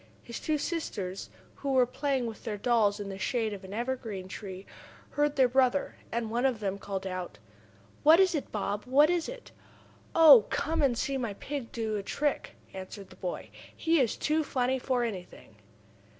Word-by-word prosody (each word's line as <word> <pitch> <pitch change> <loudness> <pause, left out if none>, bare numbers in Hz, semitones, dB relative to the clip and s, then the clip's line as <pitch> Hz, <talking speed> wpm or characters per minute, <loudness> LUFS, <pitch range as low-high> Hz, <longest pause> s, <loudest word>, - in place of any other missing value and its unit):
His 235 - -7
two 310 -1 0
sisters, 210 - -4 0.3
who 275 -1 -2
were 255 -1 +5
playing 265 0 -1
with 225 -2 -7
their 210 -2 -3
dolls 210 -2 +2
in 200 -1 -5
the 195 0 -6
shade 225 -1 0
of 200 -1 -8
an 190 - -10
evergreen 225 -4 -3
tree, 190 -1 -8 0.5
heard 295 0 +1
their 260 -2 +5
brother, 260 +2 +2 0.2
and 230 -1 -2
one 240 +2 0
of 260 -5 +2
them 200 -1 -2
called 195 -1 -4
out: 185 - -5 0.6
"What 320 +3 +7
is 380 -2 +5
it, 300 - -3
Bob? 205 +1 -2
What 290 +6 +5
is 345 -2 0
it?" - - -10 0.6
"Oh, 295 -9 +9
come 320 +1 0
and 260 -5 +2
see 275 +2 -1
my 225 -5 -3
pig 275 +1 -5
do 220 -2 -2
a - - -2
trick!" 290 +8 -2 0.2
answered 190 +1 -8
the - - -12
boy. 180 - -5 0.3
"He 330 0 +2
is 245 -5 +1
too 310 +1 +1
funny 260 -2 0
for 250 -1 0
anything!" 180 - -7
240 Hz, 185 wpm, -29 LUFS, 200-280 Hz, 0.6 s, Oh